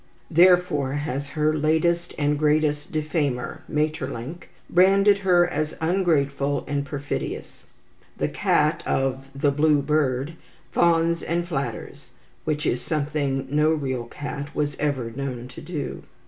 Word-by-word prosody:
Therefore 170 -5 +4
has 140 -1 -3
her 155 +1 +1
latest 160 +3 +1
and 145 0 +1
greatest 150 -1 +1
defamer, 155 -2 -2
Maeterlinck, 150 0 -3 0.2
branded 195 +3 +5
her 180 -2 +4
as 155 -3 -2
ungrateful 145 -5 +1
and 145 -1 -1
perfidious. 140 +1 -5 0.5
The - - 0
cat - - +1
of 135 0 0
"The 140 +1 +2
Blue 150 +1 +3
Bird" 140 -1 0 0.4
fawns 170 0 +3
and 170 +1 -1
flatters, 135 -9 -5 0.4
which 150 -1 -1
is 125 - 0
something 145 -3 -1
no 150 +1 +3
real 135 -6 -1
cat 145 +3 -6
was 145 -1 -1
ever 135 -6 -1
known 125 -1 -5
to - - -10
do. 155 -5 -5
150 Hz, 125 wpm, -24 LUFS, 140-165 Hz, 0.5 s, branded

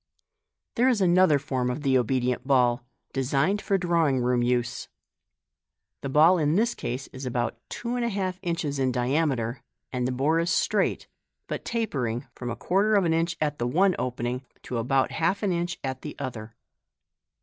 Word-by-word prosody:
There 250 +3 +4
is 240 -5 +2
another 180 -4 +5
form 130 -3 -2
of 130 +4 -4
the 135 -2 +2
Obedient 125 0 0
Ball, 125 -3 +3 0.3
designed 140 +9 +1
for 195 - +1
drawing 170 -7 +2
room 125 0 +1
use. 120 0 -1 1.1
The 135 - -4
ball 160 +6 +5
in 150 0 +2
this 235 +4 +2
case 125 +3 -4
is 130 0 -6
about 120 -1 -2
two 240 +1 -4
and 245 - -1
a 235 - +1
half 190 -3 -2
inches 160 -5 -2
in 130 -1 +2
diameter, 125 -2 0 0.3
and 125 -1 0
the - - -1
bore 145 +6 +1
is 170 +1 0
straight, - - +1 0.4
but - - -5
tapering 135 - -2
from 120 0 -6
a 115 - -3
quarter 205 +4 +2
of 195 -3 +3
an 165 - +2
inch 165 +1 0
at 150 -1 -1
the 120 - 0
one 185 +7 +3
opening 125 0 -2 0.2
to 120 - -3
about 130 +3 +1
half 185 +6 0
an 200 - +1
inch 175 +2 -2
at 130 -1 -4
the 150 - -7
other. 115 -5 -6
140 Hz, 180 wpm, -26 LUFS, 125-175 Hz, 1.1 s, another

